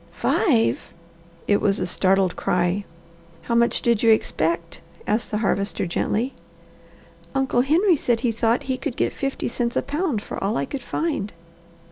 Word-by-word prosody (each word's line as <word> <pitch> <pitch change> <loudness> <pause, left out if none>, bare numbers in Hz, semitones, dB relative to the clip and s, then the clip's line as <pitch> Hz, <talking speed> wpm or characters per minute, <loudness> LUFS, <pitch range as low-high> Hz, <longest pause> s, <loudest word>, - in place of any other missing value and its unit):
"Five?" 115 +1 +1 0.5
It 205 - +3
was 200 0 +2
a 180 - 0
startled 190 0 +2
cry. 180 +3 0 0.6
"How 235 - -2
much 235 0 +2
did 235 -3 +2
you 230 - +4
expect?" 170 -6 0 0.2
asked 215 +2 0
the 210 - -1
Harvester 200 0 0
gently. 220 +8 -1 1.0
"Uncle 265 -2 +2
Henry 330 +6 +3
said 235 -4 0
he 245 -2 +1
thought 230 +1 +1
he 260 -1 -2
could 250 - -4
get - - 0
fifty 275 0 -3
cents 235 0 -2
a - - +1
pound 290 - -1
for - - -6
all 200 +2 0
I 140 - 0
could 275 - -5
find." 245 -7 -2
225 Hz, 160 wpm, -23 LUFS, 195-255 Hz, 1.0 s, you